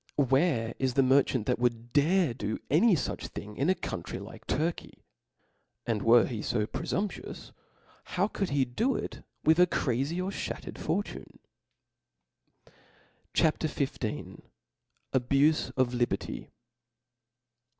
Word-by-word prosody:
Where 130 -5 +2
is 130 -2 0
the 135 - +5
merchant 130 -3 +3
that - - 0
would 120 -1 -1
dare 165 0 +3
do 105 -1 -3
any 190 +7 +5
fuch 145 - -3
thing 105 +1 -8
in 140 +9 +1
a 185 - +4
country - - -5
like - - -10
Turky?. 160 +4 -2 0.8
And 110 -3 0
were 115 +2 +6
he 115 -4 -4
{o 105 0 0
prefumpnious, 195 - -4 0.5
how 185 +2 0
could 195 -3 -2
he 140 -2 +2
do 225 - 0
ic - - -4 0.2
wich 160 +2 +4
a 180 - +7
crazy 140 +3 0
or 185 +2 -2
flbattered - - -5
fortune? 200 +5 -3 1.3
e - - -23 0.6
H - - +4
A 160 - +6
P. 150 -2 -1
XV. 110 - -5 0.7
Abufe 140 +4 +3
of 125 -1 +2
Liberty. 120 0 -2
135 Hz, 135 wpm, -29 LUFS, 120-170 Hz, 1.3 s, a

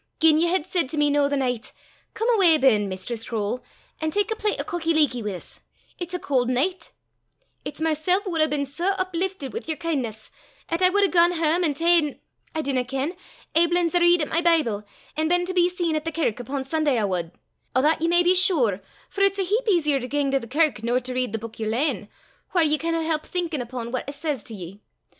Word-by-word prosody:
Gien 315 -1 +5
ye 340 - +3
had 345 -2 0
said 350 -7 0
to 310 - -5
me 295 -1 +3
noo 285 -1 +2
the 285 - 0
nicht, 250 -3 -2 0.4
'Come 450 - -1
awa 375 -9 +5
ben, 215 -8 +3
Mistress 190 +5 -5
Croale, 225 +2 -2 0.4
an' 315 - -1
tak 410 +6 0
a - - 0
plet 425 -1 -1
o' - - 0
cockie 330 -1 -1
leekie 285 -6 +2
wi' 205 -2 -3
's; - - -12 0.4
it's 350 0 -4
a - - -2
caul' 260 -6 +1
nicht;' 280 +10 -1 0.7
it's - - -6
mysel' 320 +4 +1
wad 335 -4 -1
hae 310 - +5
been 290 -2 -1
sae 335 +7 -2
upliftit 370 -4 -2
wi' 455 - -3
yer 320 - -1
kin'ness, 255 -10 -4 0.4
'at 335 +2 -1
I 365 - +7
wad 405 +2 +2
hae 395 - +4
gane 345 0 +4
hame 330 +1 +1
an' 300 -4 +1
ta'en 330 -2 +3 0.4
I 315 - -1
dinna 265 -3 0
ken 270 +7 -3 0.4
aiblins 340 +1 +3
a 350 - +4
read 345 -1 +4
at - - -3
my 335 - +1
Bible, 310 -12 +2 0.3
an' 315 +1 0
been 355 +1 +2
to 370 - -4
be 355 -1 +3
seen 350 -3 -1
at 305 - -1
the 325 - -3
kirk 300 -8 -1
upo' 265 +2 -4
Sunday 295 -1 0
I 220 - +1
wad 175 -4 -2 0.4
o' 260 - +3
that 315 +1 +2
ye 330 - +2
may 345 +1 +4
be 355 +1 +5
sure; 295 - +3 0.3
for 400 - -5
it's 395 0 +3
a 390 - +1
heap 435 +6 -1
easier 300 -7 +2
to 250 - -5
gang 280 +1 0
to 275 - +2
the 235 - -9
kirk 295 -3 +1
nor 240 +2 +1
to 255 0 -6
read 255 -3 -1
the 225 - -2
buik 225 +1 -9
yer 220 - -2
lane, 250 +8 -1 0.5
whaur 345 - +5
ye 305 -1 +2
canna 330 0 -1
help 315 -1 -1
thinkin' 340 -6 -3
upo' 240 -1 -5
what 255 +2 -3
it - - -5
says 290 -4 -3
to 225 - -7
ye. 190 +2 -9
310 Hz, 240 wpm, -24 LUFS, 255-345 Hz, 0.7 s, I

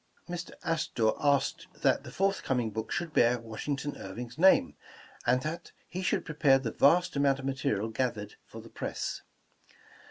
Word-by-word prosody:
'* - - -34
Mr. 175 0 -5
Astor 155 -9 +1
asked 140 -2 +1 0.2
that - - +3
the - - -9
forthcoming 135 - 0
book 110 +1 -5
should 170 -3 -2
bear 120 -2 +4
Washington 135 +6 -4
Irving 115 +5 -7
's - - -14
name, 190 +2 +5 0.5
and 125 +1 +3
that 160 +3 -5
he 185 - -5
should 180 - 0
prepare 150 -3 +4
the 125 -4 -3
vast 180 +4 +4
amount 140 -1 +3
of 135 - -7
material 130 -6 -1
gathered 110 -3 -2
for - - -10
the - - -13
press. - - -4
135 Hz, 165 wpm, -30 LUFS, 115-160 Hz, 0.5 s, name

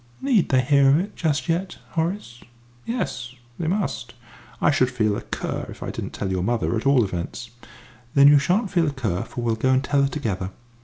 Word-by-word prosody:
"Need 255 -9 +2
they 130 -2 +4
hear 140 +1 +4
of 140 - +5
it 195 +5 -3
just 155 -2 -1
yet, 175 +3 -1
Horace?" 165 - -3 0.5
"Yes, 125 - -3 0.2
they 165 - -2
must. 125 - -2 0.4
I - - +4
should 130 -3 +2
feel 110 -5 0
a - - -4
cur - - -4
if - - -9
I - - -4
didn't - - -6
tell 95 - -3
your 95 -1 0
mother, 115 +3 0
at 115 +4 -1
all 135 -3 +5
events." 95 +5 -5 0.6
"Then 140 0 +8
you 145 0 +8
shan't 185 +8 +1
feel 170 -4 +2
a 145 - -1
cur, 105 -9 -2
for 120 - -6
we'll 115 -1 +1
go 120 +4 0
and 130 +1 +3
tell 140 +1 +2
her 140 - +2
together." 100 -11 -3
135 Hz, 210 wpm, -23 LUFS, 115-165 Hz, 0.6 s, Then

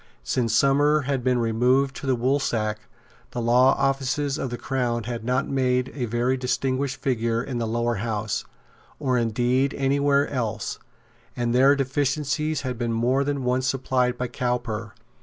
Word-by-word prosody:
Since 115 -3 0
Somers 145 +3 +3
had 135 -2 -1
been 125 0 +2
removed 125 +4 +2
to 140 - -6
the 130 - +3
Woolsack, 120 -4 0 0.5
the - - -5
law 125 +3 +4
officers 135 +1 0
of 135 - -2
the 120 - -4
Crown 120 -1 -1
had 120 0 -5
not 125 +2 0
made 125 -2 0
a 130 -4 -2
very 120 +3 0
distinguished 130 +1 -1
figure 115 -3 0
in 125 -3 -4
the 115 - -1
Lower 120 0 0
House, 110 0 -2 0.5
or 130 -4 0
indeed 125 +4 +1
any 140 +1 +1
where 140 0 +3
else; 120 -6 -3 0.6
and 120 -1 0
their 135 +3 +5
deficiencies 145 +2 -1
had 125 -3 -4
been 120 -1 -1
more 125 +4 +2
than 140 -1 -2
once 125 +1 +1
supplied 130 -2 0
by 125 - -2
Cowper. 120 -3 -3
125 Hz, 160 wpm, -24 LUFS, 120-135 Hz, 0.6 s, their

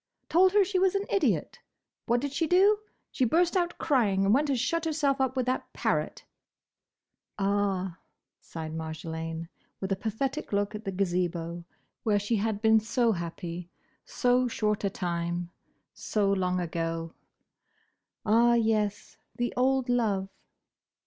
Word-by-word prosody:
Told 370 +3 +5
her 410 -1 +6
she 380 0 0
was 380 +1 +3
an 395 +1 0
idiot. 395 - +1 0.5
What 240 +1 +2
did 285 0 -3
she 325 +3 0
do? 395 +5 +5 0.3
She 260 - 0
burst 335 +9 +3
out 350 -1 0
crying, 210 -10 +2
and 200 - +4
went 290 +4 +2
and 270 - +2
shut 330 +7 0
herself 290 -4 +1
up 265 0 0
with 255 - +1
that 255 +1 -2
parrot." - - -1 1.1
"Ah!" 195 -3 0 0.4
sighed 160 -1 -7
Marjolaine, 160 +1 -5 0.3
with 190 0 -4
a - - +3
pathetic 235 +9 -3
look 205 +1 0
at 210 +1 -7
the 195 - -2
Gazebo, 175 -2 -1 0.4
where 210 -2 +2
she 205 +3 0
had 210 +1 -2
been 220 0 +6
so 235 +2 +1
happy 170 -1 -5 0.3
so 250 0 +2
short 210 -3 -1
a 200 - +2
time, 175 -1 -3 0.4
so 205 -2 0
long 185 -1 0
ago, 165 -1 -3 1.1
"Ah, 235 +3 +5
yes! 215 -3 0 0.2
The 240 0 -1
old 260 +1 +2
love!" 210 -6 +1
215 Hz, 145 wpm, -28 LUFS, 180-265 Hz, 1.1 s, her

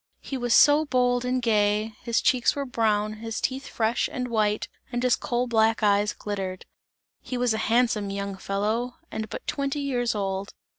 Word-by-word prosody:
He 275 - -6
was 245 -2 +1
so 295 +1 +6
bold 250 -3 +1
and 250 0 0
gay, 210 -1 +2
his 235 -1 0
cheeks 250 -2 +3
were 280 -1 -2
brown, 215 -4 0
his 225 0 -4
teeth 265 +1 -2
fresh 225 +1 0
and 250 -1 -3
white 215 -2 +1 0.2
and 245 0 -2
his 250 -1 +4
coal 245 +1 -1
black 225 -2 +2
eyes 205 0 +3
glittered; 190 -3 -5 0.6
he 255 - -5
was 245 -2 +2
a 220 - -2
handsome 225 -4 +2
young 200 0 -4
fellow 215 +6 -2 0.2
and 220 -1 -4
but - - -7
twenty 280 0 -2
years 245 -4 0
old. 195 -1 -3
230 Hz, 180 wpm, -26 LUFS, 210-250 Hz, 0.6 s, so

